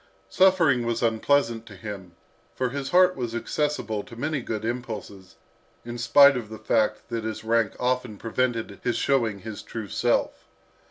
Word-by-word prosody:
Suffering 170 -10 +4
was 115 0 -1
unpleasant 115 0 +1
to - - -11
him, 100 -5 -8 0.4
for 130 -1 -1
his 135 +1 -4
heart 180 0 +5
was 120 -3 -4
accessible 120 -4 -2
to 115 - -12
many 145 +3 -2
good 110 -2 -4
impulses, 110 -5 -6 0.5
in 120 0 -6
spite 140 +4 +7
of 115 -4 -4
the 110 - -8
fact 110 +1 0
that 115 -2 -3
his 110 0 -4
rank 115 -2 +1
often 125 -3 -1
prevented 115 -2 -2
his 120 - 0
showing 115 -8 +1
his 110 0 -7
true 110 -3 -7
self. 120 +4 0
115 Hz, 160 wpm, -25 LUFS, 110-130 Hz, 0.5 s, spite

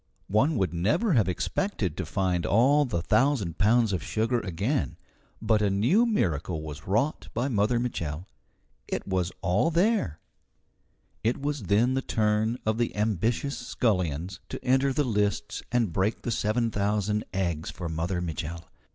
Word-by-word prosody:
One 130 +10 +3
would 95 -5 0
never 115 - +1
have 110 -8 +3
expected 95 - -1
to - - -4
find 90 -3 0
all 135 +10 +4
the 85 -10 -2
thousand 120 - +1
pounds 110 +1 +3
of 90 - -1
sugar 115 +5 0
again. 100 - -2 0.4
But 110 -1 +2
a 105 - +3
new 125 - +3
miracle 85 - 0
was 75 +1 -8
wrought 115 +11 0
by 120 +4 0
Mother 110 +1 +2
Mitchel. 85 -9 -3 0.6
It - - -3
was 95 -2 0
all 95 - +2
there! 170 - +1 1.0
It 115 +4 +1
was 140 -5 -3
then 110 +6 +3
the 135 - 0
turn 110 0 +1
of 110 +1 0
the 120 - 0
ambitious 110 +6 0
scullions 90 - -1
to - - -7
enter 135 +2 +3
the 145 +3 +1
lists 105 -3 -1
and 115 -7 +1
break 95 +5 0
the 120 - -2
seven 115 +2 0
thousand 105 +1 0
eggs 85 -5 -2
for 85 -1 -5
Mother 85 +3 -2
Mitchel. 85 -1 -4
105 Hz, 155 wpm, -27 LUFS, 90-125 Hz, 1.0 s, all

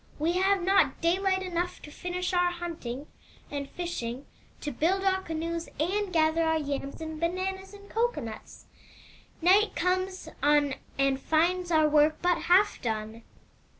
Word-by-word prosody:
We 315 +3 +1
have 380 +1 +2
not 385 +2 +3
daylight 375 +2 +1
enough 355 -1 -2
to 295 - -10
finish 360 +3 -3
our 355 0 +3
hunting 330 -7 -5 0.5
and 280 -1 -4
fishing, 275 -8 -4 0.4
to 295 - -3
build 375 +7 +1
our 380 -1 +2
canoes, 330 0 -4
and 385 +5 0
gather 320 -1 +3
our 320 -1 +2
yams 280 -1 -4
and 315 -1 -5
bananas 375 +3 -2
and 405 0 -14
cocoanuts. 445 - -3 0.8
Night 395 +4 +5
comes 370 0 -1
on 290 -1 +3 0.2
and 275 -1 +2
finds 350 +4 +1
our 315 -2 +4
work 300 +1 +4
but 355 -1 +2
half 385 +4 +4
done. 220 0 -3
340 Hz, 145 wpm, -28 LUFS, 295-370 Hz, 0.8 s, Night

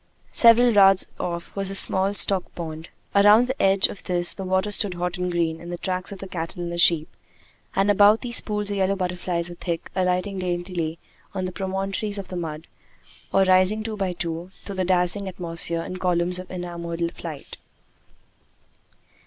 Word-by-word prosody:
Several 235 +1 +6
yards 195 -2 +5
off 170 -1 -5
was 195 -1 -1
a 195 - -3
small 195 +1 +6
stock 195 -2 -1
pond. 160 -1 -7 0.2
Around 205 +4 +6
the 260 +2 -4
edge 195 0 +4
of - - -3
this 175 -1 +1
the 195 - -7
water 190 +2 0
stood 200 -3 +1
hot 180 +1 -3
and 180 0 -1
green 165 -2 -1
in 170 - -9
the 175 - -4
tracks 185 +2 -4
of 200 - -7
the 195 - -8
cattle 175 0 -5
and 170 - -4
the 170 - -4
sheep, 165 -2 +5 0.7
and 195 +1 +3
about 205 +2 +5
these 240 -2 +4
pools 210 -1 -3
the 205 - -2
yellow 195 0 +1
butterflies 180 -2 -2
were 175 - -8
thick, 170 -1 -5
alighting 185 +1 0
daintily 175 -2 -3 0.4
on 185 - -2
the 185 - -4
promontories 195 +2 -3
of 195 - -7
the 185 - -6
mud, 160 -2 -5 0.7
or 195 - +4
rising 185 +3 +3
two 220 -1 -4
by 190 -3 -2
two 170 0 -5 0.2
through 200 -2 -7
the 185 - 0
dazzling 185 +2 0
atmosphere 170 -2 -4
in 185 - -6
columns 180 0 0
of 185 - -9
enamored 170 -1 -4
flight. 155 -5 -8
185 Hz, 185 wpm, -23 LUFS, 175-195 Hz, 0.7 s, Several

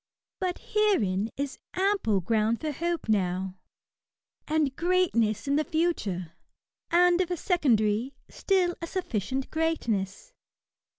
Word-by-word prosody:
But 365 -1 -1
herein 225 - +2
is 280 -1 -3 0.2
ample 370 - +1
ground 220 +4 +1
for 310 -1 -2
hope 340 +3 -2
now^ 190 -3 -1 0.9
and 305 -4 +1
greatness 325 - +1
in 280 +1 +2
the 305 - +2
future; 305 - -1 0.6
and 355 +1 +4
if 365 - -1
a 355 - 0
secondary^ 250 - +1
still 370 -3 +1
a 335 - -4
sufficient 265 - -3
greatness. 315 - -1
285 Hz, 115 wpm, -28 LUFS, 215-350 Hz, 0.9 s, and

